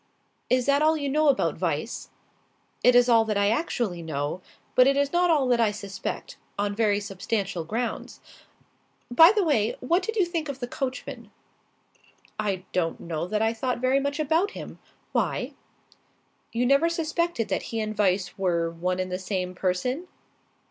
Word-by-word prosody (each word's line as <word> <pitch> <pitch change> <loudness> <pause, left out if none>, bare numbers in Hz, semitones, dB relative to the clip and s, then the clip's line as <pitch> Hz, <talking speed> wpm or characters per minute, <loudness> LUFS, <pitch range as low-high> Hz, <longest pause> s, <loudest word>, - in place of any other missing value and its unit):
"Is 255 -1 +2
that 280 +1 +3
all 315 +1 +4
you 285 -2 -2
know 305 +2 +2
about 275 -2 +1
Weiss?" - - -2 0.7
"It 250 - +6
is 245 0 +6
all 230 -2 +5
that 215 -2 -1
I 200 0 +3
actually 230 - -1
know; 155 +2 -3 0.3
but 255 0 +6
it 275 0 +3
is 285 +1 +1
not 350 0 +3
all 295 -5 +3
that 240 -1 +3
I 225 -2 +4
suspect 205 - -6 0.2
on 205 0 0
very 205 -1 +2
substantial 195 -2 -3
grounds. 225 +7 -4 0.9
By 325 +8 +8
the 420 -2 +1
way, 235 - +1
what 340 +9 +1
did 445 +4 -4
you 395 -5 +3
think 335 -3 -3
of 275 -2 -5
the 245 - -4
coachman?" 255 0 -5 1.1
"I 195 -3 -2
don't 170 -3 0
know 165 0 -4
that 215 +2 0
I 225 +1 +2
thought 250 +2 -2
very 255 +2 +2
much 280 +2 -2
about 320 +6 +2
him. - - -8 0.3
Why?" - - -1 1.0
"You 240 +2 0
never 275 +6 +4
suspected 335 -5 -1
that - - 0
he 225 - -2
and 215 0 -3
Weiss 190 -2 0
were 170 -3 +1
one 180 +2 -2
and 185 0 -3
the 180 - -2
same 185 -1 -3
person?" 195 - -1
235 Hz, 175 wpm, -26 LUFS, 195-285 Hz, 1.1 s, By